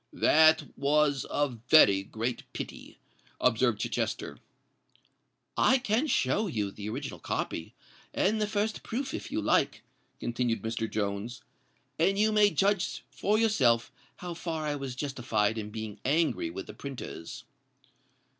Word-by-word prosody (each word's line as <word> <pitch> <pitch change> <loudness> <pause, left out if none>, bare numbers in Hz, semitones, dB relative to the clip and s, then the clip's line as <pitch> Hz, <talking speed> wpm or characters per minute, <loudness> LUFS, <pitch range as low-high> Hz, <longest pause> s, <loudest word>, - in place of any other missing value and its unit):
"That 155 -1 +4
was 145 -1 +2
a 145 0 +1
very 120 -4 +5
great 115 +5 -4
pity," - - -7 0.4
observed 120 -2 +2
Chichester. - - -2 1.2
"I 260 - +5
can 245 +3 0
show 205 - +1
you 105 - -2
the 105 +1 -6
original 135 +5 -5
copy 80 - -4 0.4
and 215 +3 +1
the 210 - +1
first 210 +1 -1
proof, 260 +4 -4
if - - -5
you - - 0
like," - - +1 0.4
continued 120 -1 -1
Mr. 110 0 -2
Jones; 105 +3 -3 0.6
"and 195 +4 +3
you 215 +1 +3
may 210 -1 +5
then 200 - -3
judge 195 +3 +1
for 210 +2 +1
yourself 130 - +3 0.2
how 175 -1 -6
far 165 -2 -4
I 150 -1 -1
was 135 -3 -5
justified 120 -6 -1
in 105 -1 -5
being 110 -1 -6
angry 165 - +1
with 365 +2 -6
the - - -9
printers." 130 -11 -7
140 Hz, 140 wpm, -29 LUFS, -, 1.2 s, very